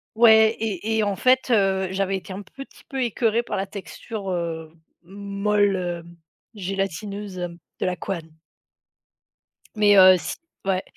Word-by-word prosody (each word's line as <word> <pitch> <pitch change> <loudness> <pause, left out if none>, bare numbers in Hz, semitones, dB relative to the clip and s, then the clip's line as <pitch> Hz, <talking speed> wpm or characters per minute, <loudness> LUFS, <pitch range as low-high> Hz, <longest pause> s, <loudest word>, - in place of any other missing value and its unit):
Ouais 220 -1 +6
et 220 0 -2
et 220 - +2
en 205 -1 0
fait, 255 +5 +2
heu, 195 -3 +2
j'avais 195 0 0
été 190 +1 -9
un 195 - -6
petit 275 +7 -13
peu 270 -1 -3
écœurée 230 0 +1
par - - -4
la 195 0 -2
texture, 200 +1 -7
heu, 165 -2 -4 0.3
molle, 200 +1 0
heu, 175 -2 -3 0.5
gélatineuse, 195 +1 -4
hem, 175 -1 -5 0.2
de - - -1
la 180 -1 0
couenne. 165 -5 -6 1.4
Mais 205 -1 +5
heu, 185 -1 +9
si - - -5 0.3
ouais. 190 0 0
195 Hz, 150 wpm, -23 LUFS, 185-215 Hz, 1.4 s, heu